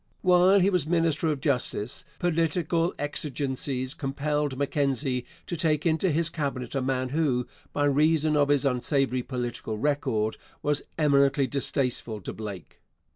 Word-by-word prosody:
While 185 +2 +6
he 195 +3 +3
was 180 -5 +1
minister 165 -2 +1
of 150 -3 -1
Justice, 125 -5 -1
political 165 0 +1
exigencies 135 -2 -2
compelled 145 0 -2
Mackenzie 135 -2 0 0.2
to 175 - -4
take 155 -3 +1
into 165 +3 +2
his 165 +1 +1
Cabinet 140 -6 -3
a 135 - 0
man 130 0 -1
who, 135 -4 +1 0.3
by 145 - +1
reason 155 +2 +3
of 145 -1 +3
his 145 -1 +3
unsavoury 130 0 +1
political 120 -3 -4
record, 110 -5 0 0.3
was 145 0 +1 0.2
eminently 140 -2 +3
distasteful 130 -5 -1
to - - -6
Blake. 100 -5 -8
145 Hz, 135 wpm, -27 LUFS, 130-155 Hz, 0.3 s, While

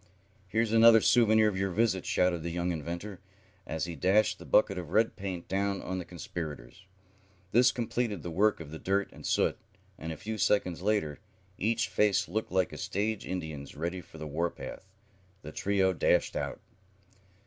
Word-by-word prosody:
"Here's 110 +3 0
another 115 0 +8
souvenir 110 -1 +5
of 105 - 0
your 95 +1 0
visit," 95 -1 +1
shouted 90 -2 +2
the 85 - -3
young 85 +1 -1
inventor, 85 +5 -5 0.5
as 80 +1 -2
he 85 -1 -6
dashed 95 +7 +2
the - - -11
bucket 100 -3 +3
of 85 -4 -7
red 110 +6 +2
paint 95 -3 -5
down 100 0 0
on 95 0 -3
the 90 - -6
conspirators. 85 0 -7 0.6
This 125 +4 +5
completed 115 -5 -2
the 85 - -5
work 105 +6 +2
of 80 -3 -9
the 80 - -7
dirt 100 +1 0
and - - -8
soot, - - +1 0.4
and 80 +1 -5
a 80 - -6
few 110 0 -5
seconds 90 -3 +1
later, 100 -8 0 0.4
each 115 +3 +1
face 105 -2 +2
looking 100 +1 -3
like 90 -2 +2
a - - -7
stage 105 +2 -2
Indian's 80 -7 -5
ready 85 +4 -3
for 80 -1 -15
the 80 - -6
war 80 +4 -1
path, - - -9 0.6
the 75 - -7
trio 95 +1 +1
dashed 80 - +2
out. - - -3
95 Hz, 180 wpm, -30 LUFS, 85-105 Hz, 0.6 s, another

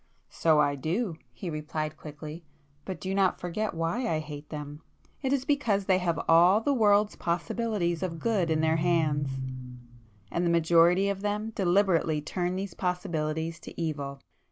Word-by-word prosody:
"So 160 -2 +3
I 145 -1 +3
do!" 165 - -2
he 125 +8 -6
replied 155 0 -3
quickly—"But 150 +1 -10
do 190 +5 -3
not 195 -1 +2
forget 180 +3 -3
why 165 +10 -1
I 160 - +1
hate 150 -1 -7
them! 150 0 -7 0.4
It 265 -2 -1
is 270 -2 +1
because 230 -9 +1
they 185 -1 +3
have 170 -3 0
all 175 +5 +6
the 280 +5 +1
world's 210 -3 +3
possibilities 175 +1 -1
of 175 -3 -3
good 195 -3 0
in 155 -1 +2
their 160 0 +2
hands, 155 -4 +1 1.0
and 170 - 0
the 175 - +2
majority 170 +3 +4
of 200 -1 -2
them 210 +2 -2
deliberately 180 -5 +2
turn 175 +4 -2
these 190 -1 -4
possibilities 165 -3 -2
to - - -10
evil. 145 -4 -3
170 Hz, 155 wpm, -28 LUFS, 155-195 Hz, 1.0 s, all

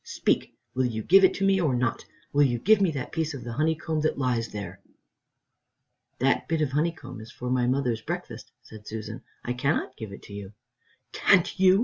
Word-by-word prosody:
Speak! - - 0 0.2
Will 130 0 +1
you 110 -2 -4
give 195 - +6
it 190 - +5
to 195 - 0
me 195 -1 +3
or 145 -7 +2
not? 125 -1 -1 0.3
Will 145 - +4
you 120 -3 +1
give 205 - +4
me 190 - +4
that 140 -5 -4
piece 160 -2 -2
of 125 - -7
the 120 -1 -5
honeycomb 160 +2 0
that 155 - 0
lies 125 -4 0
there?" 100 -4 -7 1.4
"That 135 +2 +1
bit 160 -1 +1
of 140 - -1
honeycomb 145 -5 -2
is 110 +1 -11
for 125 0 -5
my 125 -1 +2
mother's 125 -3 0
breakfast," 150 -5 -6
said 110 -3 -13
Susan; 110 +2 -6 0.2
"I 125 - -2
cannot 130 +1 -1
give 110 -3 -7
it 100 - -11
you." 100 -1 -8 0.6
"Can't 185 0 +3
you?" 190 +1 +6
130 Hz, 200 wpm, -27 LUFS, 115-160 Hz, 1.4 s, give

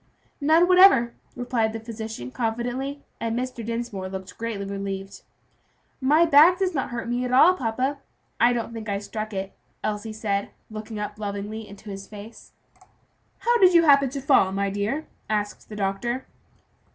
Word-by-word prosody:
"None 320 +4 +5
whatever," 365 -11 +6 0.2
replied 240 -3 0
the 225 - -4
physician 220 - -7
confidently, 245 - -3 0.2
and 230 0 -2
Mr. 250 -2 -4
Dinsmore 230 -4 -4
looked 190 0 -7
greatly 225 -3 -4
relieved. 195 0 -5 0.8
"My 300 +6 +5
back 325 +4 +7
does 375 -1 0
not 270 -4 -2
hurt 235 -1 -4
me 245 +1 -1
at 250 - -2
all, 310 +8 +7
papa; 260 -1 -2 0.4
I 240 - +5
don't 235 -1 -2
think 225 -2 -6
I 200 - 0
struck 215 +2 -5
it," 190 -1 -4 0.3
Elsie 215 +1 -3
said, 205 -2 -2 0.2
looking 215 0 -7
up 210 0 -5
lovingly 210 +1 -5
into 200 +1 -10
his 195 0 -8
face. 210 +2 -11 0.9
"How 475 0 +3
did 370 -3 +6
you 335 - +7
happen 280 -3 +5
to 275 +2 -5
fall, 265 -9 +4
my 200 0 -1
dear?" 210 +10 -2 0.2
asked 210 -1 -2
the 215 - -7
doctor. 210 +6 -2
225 Hz, 165 wpm, -25 LUFS, 205-265 Hz, 0.9 s, back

